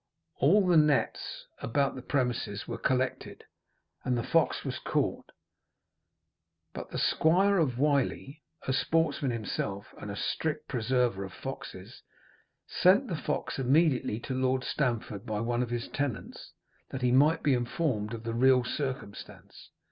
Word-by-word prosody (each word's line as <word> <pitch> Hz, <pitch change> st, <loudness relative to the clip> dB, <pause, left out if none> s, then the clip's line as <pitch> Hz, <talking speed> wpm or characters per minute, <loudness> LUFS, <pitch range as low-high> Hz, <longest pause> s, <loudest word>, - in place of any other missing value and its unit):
All 190 Hz, +9 st, +5 dB
the 175 Hz, -2 st, +4 dB
nets 150 Hz, -2 st, +1 dB, 0.2 s
about 140 Hz, +4 st, +1 dB
the 130 Hz, -, -7 dB
premises 125 Hz, -6 st, -2 dB
were -, -, -5 dB
collected, 130 Hz, -1 st, -1 dB, 0.6 s
and 125 Hz, -1 st, 0 dB
the 120 Hz, -, -1 dB
fox -, -, +1 dB
was -, -, -3 dB
caught; -, -, -2 dB, 1.4 s
but -, -, -7 dB
the -, -, -5 dB
Squire 190 Hz, +5 st, +3 dB
of 130 Hz, -7 st, +1 dB
Wiley, 140 Hz, +1 st, 0 dB, 0.2 s
a 130 Hz, -, -1 dB
sportsman 155 Hz, -1 st, +1 dB
himself, 105 Hz, -3 st, -4 dB
and 105 Hz, -, -7 dB
a 100 Hz, -, -4 dB
strict 155 Hz, +8 st, -2 dB
preserver 120 Hz, -4 st, 0 dB
of 95 Hz, -, -7 dB
foxes, -, -, -8 dB, 0.6 s
sent -, -, +3 dB
the -, -, -1 dB
fox -, -, -3 dB
immediately 135 Hz, -4 st, +2 dB
to 130 Hz, -, -4 dB
Lord 130 Hz, 0 st, +1 dB
Stamford 115 Hz, -8 st, -2 dB
by 110 Hz, -3 st, -3 dB
one 120 Hz, +2 st, 0 dB
of 125 Hz, -, -2 dB
his 120 Hz, -1 st, -3 dB
tenants, 140 Hz, -5 st, -4 dB, 0.4 s
that 130 Hz, -1 st, -5 dB
he 125 Hz, -, +3 dB
might 145 Hz, +5 st, +4 dB
be 145 Hz, -, +4 dB
informed 120 Hz, -3 st, -1 dB
of 115 Hz, -, -9 dB
the 115 Hz, 0 st, -3 dB
real 130 Hz, +1 st, +4 dB
circumstance. 130 Hz, -5 st, -6 dB
130 Hz, 145 wpm, -29 LUFS, 115-145 Hz, 1.4 s, All